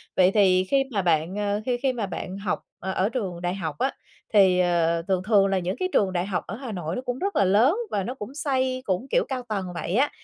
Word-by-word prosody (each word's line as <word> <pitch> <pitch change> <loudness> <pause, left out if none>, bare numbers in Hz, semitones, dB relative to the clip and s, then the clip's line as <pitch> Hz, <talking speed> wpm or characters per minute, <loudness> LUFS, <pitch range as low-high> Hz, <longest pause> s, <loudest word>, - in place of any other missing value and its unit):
Vậy 185 0 +5
thì 185 -3 +4
khi 275 -1 +3
mà 200 -3 0
bạn, 170 +1 +1
ờ, 205 0 -1
khi 245 -1 0
khi 260 0 0
mà 225 -4 -2
bạn 190 0 -6
học 200 -2 -2 0.2
ở 190 +2 -1
trường 190 -9 -4
đại 180 +1 -1
học 160 -6 -4
á, 270 - +1 0.4
thì, 190 -3 +5
ờ, 170 -2 +2
thường 185 -1 +1
thường 205 -2 +4
là 195 -1 +1
những 180 +1 -2
cái 370 0 0
trường 190 -2 +2
đại 175 0 0
học 190 -2 -2
ở 200 - -5
Hà 250 -2 -7
Nội 175 -3 -4
nó 250 - -3
cũng 250 0 -4
rất 400 +1 -2
là 200 - +4
lớn 225 - +4 0.2
và 200 -2 0
nó 245 - -4
cũng 245 +3 -8
xây 260 -3 0
cũng, 190 +7 -1
kiểu, - - +2
cao 260 -2 -2
tầng 200 -3 -2
vậy 170 +2 -3
á, 280 +4 +3
200 Hz, 260 wpm, -25 LUFS, 185-250 Hz, 0.4 s, Vậy